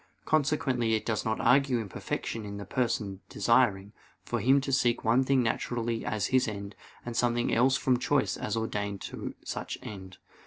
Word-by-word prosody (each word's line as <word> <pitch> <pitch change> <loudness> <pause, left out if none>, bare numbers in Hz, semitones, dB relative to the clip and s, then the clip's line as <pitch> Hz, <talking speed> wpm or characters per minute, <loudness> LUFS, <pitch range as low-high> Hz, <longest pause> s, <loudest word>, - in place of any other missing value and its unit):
Consequently 135 -6 +1
it 110 - -3
does 110 -2 -1
not 110 0 0
argue 135 -1 +4
imperfection 110 +1 -4
in 100 -1 -6
the 100 - -6
person 105 -4 -1
desiring, 100 +1 +2 0.3
for 120 - -1
him 130 +6 +4
to 135 - -3
seek 120 -3 +2
one 115 +4 +4
thing 130 -1 +2
naturally 115 0 -1
as 110 -2 -1
his 130 -1 +4
end, 100 -1 -5 0.3
and 120 -1 -5
something 120 0 +1
else 130 +3 +4
from 130 -2 +1
choice 140 +2 +1
as 105 - -3
ordained 100 -3 -2
to - - -6
such - - -4
end. 95 -3 -9
115 Hz, 170 wpm, -29 LUFS, 105-130 Hz, 0.3 s, argue